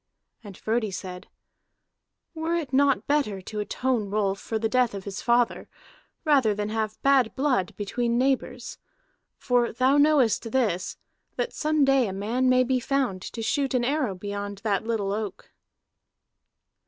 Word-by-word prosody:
And 200 -4 -10
Frodi 220 0 -1
said: 185 0 -7 1.1
"Were 325 +1 -1
it 300 -6 -3
not 275 0 +3
better 280 -10 0
to 210 +3 -6
atone 225 0 -1
Rolf 200 -1 0
for 225 - -3
the 220 0 0
death 245 -2 +1
of 195 - -6
his 200 0 -6
father, 240 0 +1 0.6
rather 265 -9 +4
than 210 0 -2
have 215 -1 -2
bad 270 -4 +3
blood 260 -10 0
between 235 +3 -1
neighbors? 255 -1 -1 0.6
For 245 -2 +1
thou 260 +4 +3
knowest 280 -6 +3
this, 215 -9 0 0.4
that - - -2
some 305 -2 +2
day 270 -3 +3
a 190 - -4
man 230 +6 0
may 255 0 +5
be 255 0 +1
found 250 -8 -1
to 225 +4 -6
shoot 270 +3 0
an 240 -1 +1
arrow 270 -7 0
beyond 200 +1 -5
that 205 -3 0
little 220 -3 -1
oak." 210 -2 -5
235 Hz, 155 wpm, -26 LUFS, 205-265 Hz, 1.1 s, may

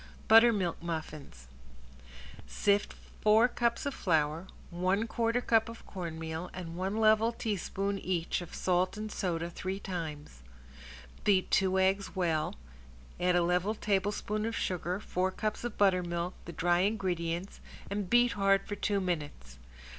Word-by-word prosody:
~BUTTERMILK 220 -7 +5
MUFFINS~ 155 - -6 1.0
Sift 200 - +1 0.3
four 220 +3 +6
cups 235 0 -1
of 280 - -1
flour, 160 - 0 0.2
one 185 +5 +1
quarter 230 +1 0
cup 225 -1 +2
of 230 - -11
cornmeal, 165 -2 -5
and 170 -2 -6
one 190 +4 -2
level 220 +1 +4
teaspoon 200 -3 -2
each 180 -2 -1
of 175 - -9
salt 185 +2 +1
and 215 0 -5
soda 170 -4 -2
three 185 +3 -4
times. 155 - -6 0.8
Beat 195 -3 +2
two 190 -1 +3
eggs 195 +2 +1
well, 165 -4 0 0.6
add 180 0 +2
a 175 - +4
level 180 +5 +1
tablespoon 205 +1 -1
of 230 - -3
sugar, 180 +1 -2
four 185 -2 -1
cups 215 +4 -3
of 240 -3 -4
buttermilk, 180 -3 +1
the 170 - -6
dry 175 +1 +2
ingredients, 180 -3 -1 0.3
and 200 -2 -3
beat 240 0 +5
hard 195 -1 +2
for - - -4
two 205 0 0
minutes. 150 - -4
185 Hz, 140 wpm, -31 LUFS, 170-210 Hz, 1.0 s, four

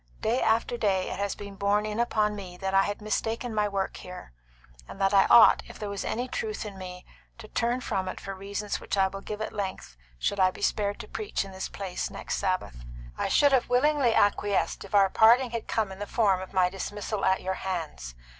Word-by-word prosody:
Day 235 +4 +1
after 230 +2 +1
day 195 -5 0
it - - -5
has 200 0 -1
been 200 -1 -8
borne 200 +2 +1
in 215 +1 -3
upon 215 -3 +1
me 185 -3 -8
that 190 +1 -3
I 195 - +6
had 205 +1 -4
mistaken 225 +2 -2
my 210 -1 +1
work 195 -1 -2
here, 180 - -10 0.5
and - - -10
that 195 0 +2
I 195 -1 +6
ought, 235 - +8
if - - -11
there 210 -1 -5
was 200 - -4
any 245 +2 -2
truth 430 - -4
in 205 -2 -7
me, 180 -1 -9 0.3
to 225 -2 -11
turn 240 +3 0
from 190 -6 -2
it 185 - -5
for 195 - -6
reasons 200 +2 -4
which - - -3
I 190 0 +3
will 195 +1 -7
give 210 +1 -6
at - - -6
length 190 - -5 0.2
should 200 - -1
I 185 -1 +5
be - - -9
spared 205 -1 0
to - - -11
preach 420 - -3
in 195 - -10
this 190 0 -5
place 195 -2 -4
next - - -4
Sabbath. 120 - -2 0.3
I - - -1
should 285 -1 +4
have 260 -3 +2
willingly 255 -1 +3
acquiesced 205 -4 +1
if 195 +1 -5
our 200 -1 +6
parting 235 +3 +5
had 230 -1 -4
come 215 -3 -1
in 190 - -9
the 205 - -4
form 195 -5 +2
of 185 - -8
my 185 -2 +3
dismissal 200 +2 -4
at 190 - +2
your 190 +1 -1
hands. 160 - -4
200 Hz, 230 wpm, -27 LUFS, 190-220 Hz, 0.5 s, ought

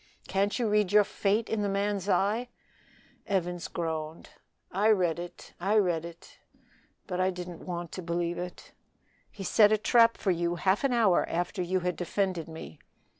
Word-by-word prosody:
Can't 200 +1 0
you 240 -3 0
read 210 -3 +2
your 210 0 +6
fate 205 +2 0
in 220 -1 -1
the 205 - 0
man's 200 0 -1
eye?" 215 +6 +1 0.8
Evans 180 -2 -1
groaned. 160 -2 -4 0.4
"I 205 +4 +2
read 180 -6 +2
it, 175 0 -9
I 195 +5 +1
read 175 -5 +2
it, 170 0 -12 0.7
but 185 -2 -2
I 185 - +3
didn't 180 -2 -7
want 175 -2 -4
to 185 - -6
believe 170 0 -2
it." 180 0 -7 0.6
"He 195 - -9
set 210 +2 +5
a 215 - +4
trap 230 +2 +4
for 195 - 0
you 170 0 0
half 190 +5 +1
an 275 - +2
hour 225 -7 +3
after 175 +3 -2
you 185 +1 0
had 180 0 -1
defended 180 -2 -2
me." 160 - -9
185 Hz, 175 wpm, -29 LUFS, 175-205 Hz, 0.8 s, your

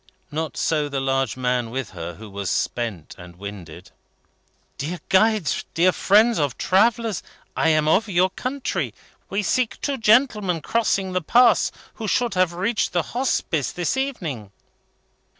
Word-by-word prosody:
Not 160 +1 -3
so 150 -2 0
the 140 -1 -2
large 135 -3 0
man 125 -2 0
with 130 -1 -4
her, 85 -2 -7
who 110 +4 -11
was 100 -1 -4
spent 110 -10 -2
and 90 0 -12
winded. 95 -4 -9 0.9
"Dear 165 +5 -4
guides, 200 -4 +2
dear 180 +3 +4
friends 215 +4 +4
of 145 -4 -1
travellers! 215 0 +2 0.3
I 160 - +2
am 155 -1 +2
of 200 +7 +3
your 185 0 +2
country. 260 +6 -3 0.3
We 200 +2 -1
seek 250 +3 0
two 275 -2 -2
gentlemen 215 - +3
crossing 195 -2 0
the 185 - 0
Pass, 235 +7 +4 0.2
who 220 - -6
should 240 +3 +1
have 185 -2 +2
reached 200 +6 -1
the 175 -2 +1
Hospice 230 - 0
this 175 +5 -1
evening." 165 - -3
175 Hz, 150 wpm, -23 LUFS, 130-220 Hz, 0.9 s, dear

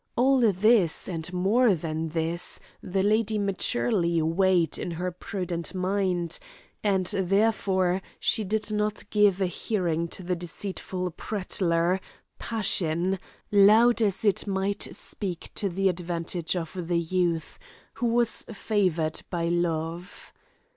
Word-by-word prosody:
All 265 +2 +4
this, 195 -2 +3
and 165 -1 -4
more 200 +5 +3
than 160 0 -3
this, 165 +2 -2 0.2
the 190 +1 -1
lady 215 +1 +2
maturely 195 -3 0
weighed 170 +1 +2
in - - -3
her 175 +2 -3
prudent 180 -1 -4
mind, 185 -2 -1 0.4
and 195 -3 +2
therefore 190 -1 +1 0.2
she 220 - +2
did 215 +2 -1
not 210 0 -1
give 205 -3 +4
a 190 - +2
hearing 175 -2 -1
to 185 - -5
the 180 +1 -1
deceitful 180 +1 -4
prattler, 180 -2 0 0.4
passion, 190 -4 0 0.3
loud 215 +4 +6
as 205 0 +2
it 205 0 +2
might 195 +1 -1
speak 185 -5 -3
to 200 - -1
the 195 +2 0
advantage 170 -1 -1
of 175 0 -4
the 175 -1 +1
youth, 170 -1 -1 0.3
who 240 +1 -1
was 235 0 +2
favoured 185 -7 0
by 170 -1 -1
love. 170 +1 -3
185 Hz, 125 wpm, -26 LUFS, 170-205 Hz, 0.4 s, loud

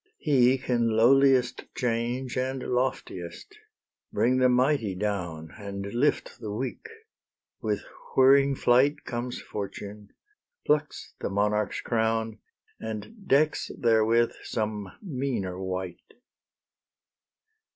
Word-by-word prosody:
He 130 - +4
can 120 -2 0
lowliest 125 +2 +4
change 120 +1 -1
And 130 0 -2
loftiest; 125 - -3 0.6
bring 125 +2 +2
the 130 0 +5
mighty 125 -5 +2
down 90 -6 -3
And 100 -1 -5
lift 135 +5 0
the 110 -3 -5
weak; 130 - -4 0.7
with - - -1 0.3
whirring 135 +1 +6
flight 130 +4 +3
Comes 120 +1 -4
Fortune, 100 0 -7 0.6
plucks 150 0 0
the - - -2
monarch's 105 +1 0
crown, 110 -1 0 0.4
And 110 - -7
decks 150 +3 +2
therewith 115 0 +3
some 105 -3 -3
meaner 125 - -3
wight. 95 -2 -5
120 Hz, 100 wpm, -27 LUFS, 105-130 Hz, 0.7 s, whirring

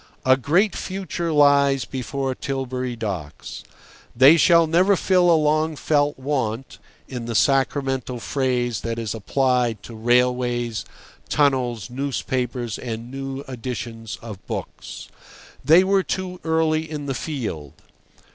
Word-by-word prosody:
A 130 0 +6
great 175 - +1
future 185 -3 -4
lies 140 -4 +4
before 135 +2 -3
Tilbury 130 -2 -3
Docks. 95 -10 -6 0.5
They 135 +6 +8
shall 170 +1 +5
never 180 +5 +3
fill 180 -1 +3
a 165 - +6
long 155 +1 +1
felt 145 0 +1
want 130 -3 -3 0.3
(in 125 -3 -6
the 115 -1 -4
sacramental 135 +1 +1
phrase 125 -3 -1
that 115 0 -3
is 115 -3 -3
applied 120 0 0
to 120 - -10
railways, 120 0 +1 0.4
tunnels, 125 -6 +1
newspapers, 125 -3 -3
and 115 0 -6
new 135 0 -5
editions 120 -4 -6
of 105 -4 -9
books). - - -7 0.6
They 160 +7 +6
were 195 0 +3
too 185 -1 -4
early 160 -1 +1
in 150 -2 -5
the 135 - -2
field. 115 - -5
130 Hz, 125 wpm, -22 LUFS, 120-150 Hz, 0.6 s, They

